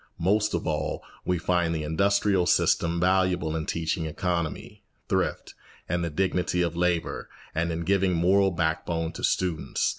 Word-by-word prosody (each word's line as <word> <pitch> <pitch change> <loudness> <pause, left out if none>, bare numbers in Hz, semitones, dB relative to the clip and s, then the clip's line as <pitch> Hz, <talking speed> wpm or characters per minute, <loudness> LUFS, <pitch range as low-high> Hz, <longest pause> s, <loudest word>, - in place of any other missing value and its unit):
Most 105 +4 +1
of - - -3
all, 80 -3 -2 0.2
we 90 - +1
find 85 -1 +1
the 80 - -2
industrial 100 +3 +2
system 85 +1 +2
valuable 90 -3 +2
in 80 -1 -3
teaching 80 0 -1
economy, 85 0 -3 0.3
thrift, - - -1 0.3
and 85 +1 -1
the 85 - -1
dignity 90 +1 0
of 85 -1 -2
labour 85 -1 -1 0.2
and 85 +1 0
in 85 +1 -3
giving 95 +1 +2
moral 95 +4 +4
backbone 80 -1 -1
to 80 - -9
students. 90 -4 0
85 Hz, 150 wpm, -26 LUFS, 80-90 Hz, 0.3 s, moral